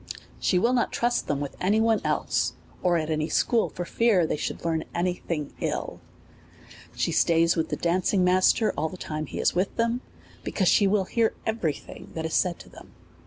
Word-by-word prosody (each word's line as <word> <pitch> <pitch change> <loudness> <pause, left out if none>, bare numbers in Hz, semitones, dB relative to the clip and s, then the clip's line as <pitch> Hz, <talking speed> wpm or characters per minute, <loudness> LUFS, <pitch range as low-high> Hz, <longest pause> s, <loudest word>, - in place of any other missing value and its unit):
She 185 - +2
will 235 +7 +2
not 245 - +1
trust 240 0 0
them 145 - -1
with 145 -1 -5
any 205 +4 +3
one 225 -1 +2
else, - - 0 0.3
or 175 -2 +3
at 160 -1 -2
any 155 0 -1
school, 235 -2 +2
for 175 - -5
fear 205 -2 +3
they - - -1
should 150 - -5
learn 160 -1 0
any 180 +1 +1
thing 155 -5 -5
ill. - - -3 0.9
She - - 0
stays 165 0 +3
with 160 -1 -1
the - - -2
danc 175 +1 +1
ing 190 -3 +2
master 185 +5 +3
all 155 +2 -1
the 185 - -9
time 155 -3 -4
he - - -7
is - - +2
with 185 +2 -1
them, 230 +2 0 0.4
because 190 - 0
she 200 - +4
will 200 0 +2
hear 230 +3 +1
every 220 -9 0
thing - - -12
that 160 0 -3
is 160 - -3
said 180 -2 +1
to - - -14
them. - - -15
180 Hz, 210 wpm, -26 LUFS, 160-215 Hz, 0.9 s, she